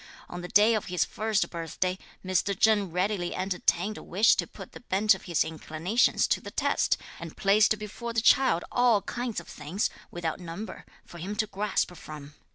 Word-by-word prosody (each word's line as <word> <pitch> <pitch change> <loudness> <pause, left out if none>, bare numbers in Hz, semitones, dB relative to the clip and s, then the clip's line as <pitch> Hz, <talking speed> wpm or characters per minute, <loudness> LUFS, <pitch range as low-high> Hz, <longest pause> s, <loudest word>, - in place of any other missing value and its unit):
On 175 - -6
the 180 - -6
day 210 +5 +5
of 215 - -1
his 180 -2 0
first 215 -1 -1
birthday, 180 +2 -3 0.3
Mr. 185 +1 0
Cheng 210 -3 +4
readily 180 0 -1
entertained 190 +2 0
a - - -10
wish 205 +6 +4
to - - -1
put - - -11
the - - -11
bent 210 -2 +3
of 190 - -8
his 170 -3 +2
inclinations 160 +7 +1
to - - +1
the - - -8
test, - - +1 0.2
and 170 -2 -9
placed 210 +2 +4
before 215 +3 -6
the 230 - +1
child 235 -6 +4
all 240 -5 +3
kinds 240 +1 -3
of - - -13
things, 160 +8 -3 0.2
without 170 -1 -4
number, 180 +5 -8 0.2
for 170 - -12
him 195 +5 -4
to 215 - +1
grasp 205 -3 -1
from. 150 -3 -10
195 Hz, 185 wpm, -28 LUFS, 175-215 Hz, 0.3 s, day